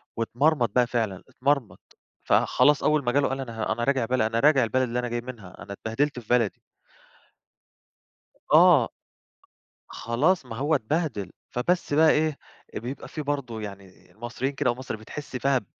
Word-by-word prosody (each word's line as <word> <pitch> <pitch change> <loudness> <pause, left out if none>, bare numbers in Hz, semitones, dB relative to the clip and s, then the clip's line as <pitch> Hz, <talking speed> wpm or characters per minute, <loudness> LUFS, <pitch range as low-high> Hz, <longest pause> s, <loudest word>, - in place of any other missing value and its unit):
واتمرمط 125 +2 +1
بقى 125 -1 +4
فعلًا، 110 -6 -2
اتمرمط.فخلاص 140 +2 0
أول 150 -1 +2
ما 120 - +1
جاله 140 +2 +2
قال: 135 - -3
"أنا 115 -4 -4
أنا 120 - -3
راجع 135 -2 +1
بلد 130 +2 0
أنا 110 +1 +1
راجع 140 -1 +5
البلد 130 +3 +1
اللي 125 -1 -1
أنا 125 - -2
جاي 120 0 -2
منها 115 -7 -10
أنا 100 - -8
اتبهدلت 125 +7 -2
في 110 - -16
بلدي." 120 -4 +1 1.9
آه. 160 -6 +6 1.0
خلاص 140 +8 0
ما 115 -2 -7
هو 145 +6 +1
اتبهدل 120 - -2 0.2
فبس 160 +5 -1
بقى 155 +1 +6
إيه 155 -1 +1 0.4
بيبقى 125 +5 -6
فيه 155 - -6
برضه 140 -6 -3
يعني 100 -2 -11
مصريين 120 +4 -4
كده 140 -2 0
أو 120 - 0
مصر 130 -2 -5
بتحس 130 +6 -9
فيها 135 +1 +2
ب 115 - -5
125 Hz, 160 wpm, -26 LUFS, 115-145 Hz, 1.9 s, آه